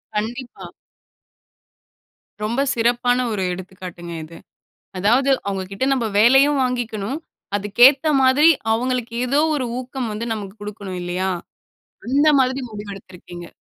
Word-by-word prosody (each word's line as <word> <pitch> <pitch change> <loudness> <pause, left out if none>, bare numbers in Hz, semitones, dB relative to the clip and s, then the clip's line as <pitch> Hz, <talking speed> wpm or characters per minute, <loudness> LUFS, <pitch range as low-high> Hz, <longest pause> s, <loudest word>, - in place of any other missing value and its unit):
கண்டிப்பா. 240 +4 -5 1.7
ரொம்ப 235 +5 0
சிறப்பான 245 +1 +1
ஒரு 200 -3 -2
எடுத்துக்காட்டுங்க 180 -2 -9
இது. 165 +2 -12 0.6
அதாவது, 240 +8 +3 0.2
அவங்க 195 -1 -2
கிட்ட 195 +6 -2
நம்ம 250 -4 0
வேலயும் 270 +6 +5
வாங்கிக்கணும். 240 -1 -2 0.4
அதுக்கேத்த 240 +9 +5
மாதிரி, 265 +5 +5 0.2
அவங்களுக்கு 245 0 -1
ஏதோ 280 +4 +2
ஒரு 265 -4 -1
ஊக்கம் 255 -2 -5
வந்து 220 +2 -4
நமக்கு 200 -3 -7
கொடுக்கணும் 200 -3 -6
இல்லயா? 180 +2 -2 0.8
அந்த 285 +4 +3
மாதிரி 260 +1 +1
முடிவு 205 -1 -7
எடுத்துருக்கீங்க. 175 -2 -11
230 Hz, 115 wpm, -21 LUFS, 195-255 Hz, 1.7 s, வேலயும்